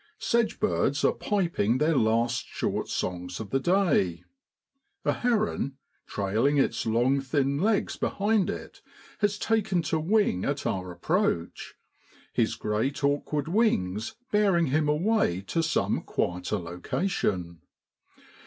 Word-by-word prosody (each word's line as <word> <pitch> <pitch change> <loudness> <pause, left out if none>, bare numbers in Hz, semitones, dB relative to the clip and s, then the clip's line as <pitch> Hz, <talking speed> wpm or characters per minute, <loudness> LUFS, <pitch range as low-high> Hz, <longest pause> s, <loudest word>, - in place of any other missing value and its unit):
Sedge 225 +1 0
birds 145 -9 +1
are - - +4
piping 170 - 0
their 155 +3 +2
last 115 +1 +1
short - - -2
songs 90 0 -3
of 110 -3 -7
the 135 - +2
day. 150 - +2 0.8
A - - +3
heron, 215 - 0 0.3
trailing 110 +9 +1
its 135 - +1
long 120 +5 +2
thin 140 +1 0
legs 210 +3 +1
behind 205 -1 +1
it, - - -7 0.4
has 205 -1 +1
taken 215 -6 +1
towing 160 - +1
at 140 0 -2
our 90 -1 -2
approach, 90 - -1 0.6
his - - +1
great 115 +7 -2
awkward 145 +1 0
wings 110 - 0 0.2
bearing 195 -5 +3
him 150 -1 +2
away 155 - +1
to 165 - -1
some 160 -1 0
quieter 90 +4 -2
location. 90 - -2
140 Hz, 120 wpm, -27 LUFS, -, 0.8 s, are